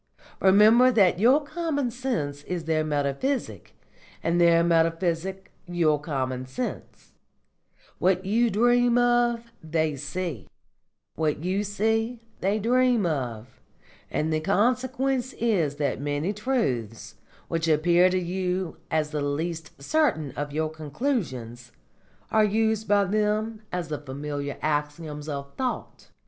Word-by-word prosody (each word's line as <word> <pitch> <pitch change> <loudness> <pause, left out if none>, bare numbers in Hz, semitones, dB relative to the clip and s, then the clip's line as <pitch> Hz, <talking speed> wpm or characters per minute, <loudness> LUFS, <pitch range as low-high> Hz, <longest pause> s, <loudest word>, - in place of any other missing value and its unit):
Remember 215 +6 +6
that 190 -6 +4
your 260 +8 +5
common 285 -5 -2
sense 165 - -3
is 180 -2 -3
their 155 0 +1
metaphysic, 150 - -2 0.5
and 170 +1 +2
their 170 -1 +5
metaphysic 170 +3 0 0.2
your 160 -4 +1
common 130 -4 -3
sense; 245 - -6 0.9
what 185 0 +2
you 230 +4 +2
dream 240 +3 +3
of, 240 -1 +2
they 160 -1 -1
see; 145 - -5 0.7
what 155 -1 -1
you 190 +3 0
see, 225 +3 0 0.2
they 200 +3 +1
dream 245 0 +2
of; 125 -6 -4 0.5
and 155 +1 -1
the 155 - +1
consequence 255 +7 0
is 185 -11 0
that 145 -2 -2
many 145 +6 -1
truths, 125 - -2 0.3
which 165 -1 -1
appear 170 +3 +4
to 185 - 0
you 180 0 -2
as 155 -1 0
the 150 -1 -2
least 160 +2 -3
certain 160 - +1
of 145 +2 -5
your 155 +1 -1
conclusions, 145 - -3 0.6
are 220 -1 +4
used 220 +1 +1
by 205 -1 +4
them 215 +2 0
as 175 -3 -3
the 150 - -3
familiar 145 0 -5
axioms 150 0 -2
of 140 -1 -5
thought. 255 -2 -4
175 Hz, 125 wpm, -26 LUFS, 150-225 Hz, 0.9 s, Remember